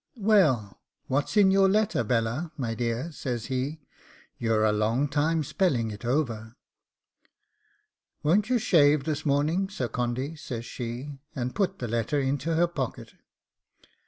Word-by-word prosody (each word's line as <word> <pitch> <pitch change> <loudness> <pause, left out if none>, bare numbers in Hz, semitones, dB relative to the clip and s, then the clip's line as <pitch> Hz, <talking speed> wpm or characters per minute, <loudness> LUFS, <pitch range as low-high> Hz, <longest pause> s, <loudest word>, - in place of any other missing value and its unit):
'Well, 185 - +2 0.2
what's 145 +8 -1
in 195 -2 +6
your 195 0 +5
letter, 210 - +2
Bella, 115 +8 -1
my 120 -5 -2
dear?' 120 +6 -2
says 125 -6 -4
he: 140 +5 -2 0.6
'you're 110 -2 +2
a 110 - +4
long 110 +6 +1
time 155 +3 +1
spelling 130 - 0
it 105 +2 -9
over.' 120 -4 -1 1.7
'Won't 195 +9 +2
you 255 - +3
shave 150 - +4
this 155 0 -2
morning, 155 +7 +1
Sir 130 -11 -3
Condy?' 125 +6 -2
says 120 -6 -6
she, 125 +5 -6 0.2
and 125 -2 -3
put 195 -2 0
the 120 - -4
letter 115 +5 0
into 140 +4 -1
her 170 +2 +4
pocket. 140 -8 -5
140 Hz, 140 wpm, -27 LUFS, 120-165 Hz, 1.7 s, in